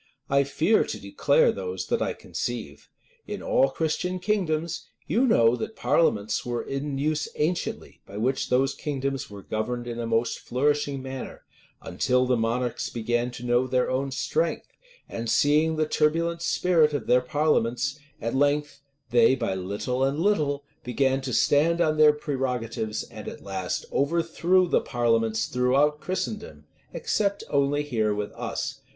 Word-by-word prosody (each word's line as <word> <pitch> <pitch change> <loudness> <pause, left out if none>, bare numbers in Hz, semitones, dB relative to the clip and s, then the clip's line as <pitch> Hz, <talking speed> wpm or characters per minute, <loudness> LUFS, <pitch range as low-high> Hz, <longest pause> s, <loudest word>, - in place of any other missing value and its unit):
I 140 0 +4
fear 160 +10 +2
to - - -5
declare 485 -1 +3
those 455 - -4
that - - -1
I - - 0
conceive. - - -6 0.4
In - - -5
all - - +3
Christian 175 +3 -1
kingdoms, 170 -4 -1 0.2
you 255 +4 +2
know 115 - +4
that 220 - -5
parliaments 105 -10 +1
were 120 -1 -3
in 135 0 -3
use 150 +2 0
anciently, 170 +4 -2
by 100 - -9
which 130 +5 0
those 135 +2 +2
kingdoms 135 -2 -3
were 100 -1 -10
governed 115 +8 -3
in 120 -1 -5
a 115 - -2
most 115 +1 0
flourishing 145 +1 0
manner; 130 -1 -7 0.4
until 125 0 +1
the 125 0 +2
monarchs 120 +1 -1
began 120 +1 -1
to 125 0 -8
know 120 +1 +2
their 130 0 +1
own 135 +2 0
strength, 470 - -1 0.4
and 115 0 -5
seeing 155 +5 +3
the 155 0 +1
turbulent 165 +3 +1
spirit 165 -4 +3
of 135 - -3
their 125 0 +4
parliaments, 140 0 0 0.2
at 115 - -3
length 145 +1 +1 0.3
they, 120 +1 +5
by 95 - -2
little 100 +8 -2
and 135 +2 +1
little, 150 -7 +1 0.2
began 135 +2 +1
to 130 -1 -4
stand 155 +8 +3
on 155 -2 +2
their 155 -1 +7
prerogatives, 125 -7 -3
and - - -10
at - - -8
last 95 -2 -3
overthrew 170 +4 +2
the - - +2
parliaments, 115 -2 +1
throughout 135 +4 +2
Christendom, 210 +3 -4 0.3
except 215 - -1
here - - -16
only 145 +1 0 0.3
with 105 0 -3
us. - - -4
140 Hz, 155 wpm, -26 LUFS, 120-155 Hz, 0.4 s, their